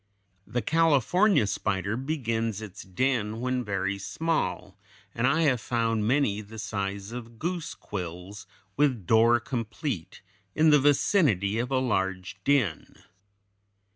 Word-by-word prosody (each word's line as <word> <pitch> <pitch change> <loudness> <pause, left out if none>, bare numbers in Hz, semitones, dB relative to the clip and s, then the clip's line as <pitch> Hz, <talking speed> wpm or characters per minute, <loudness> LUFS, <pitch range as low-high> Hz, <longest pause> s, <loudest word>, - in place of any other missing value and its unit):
The 120 -2 -2
California 165 - +3
spider 100 0 -1
begins 115 -6 -2
its 105 -2 -9
den 110 +2 -1
when 125 0 -1
very 100 -1 -2
small, 125 - -2 0.3
and 120 +2 +1
I 155 +4 +2
have 130 -6 +2
found 115 -2 0
many 120 -5 +1
the 110 +2 -12
size 100 -1 -4
of 115 -1 -8
goose 170 +3 -3
quills, 95 +1 -7 0.3
with 130 -9 +1
door 115 +5 +5
complete, 115 - -5 0.3
in 155 0 +5
the 150 - +6
vicinity 130 - +2
of 125 +1 -2
a 135 - +1
large 95 -6 -1
den. 120 - 0
115 Hz, 125 wpm, -27 LUFS, 100-135 Hz, 0.3 s, the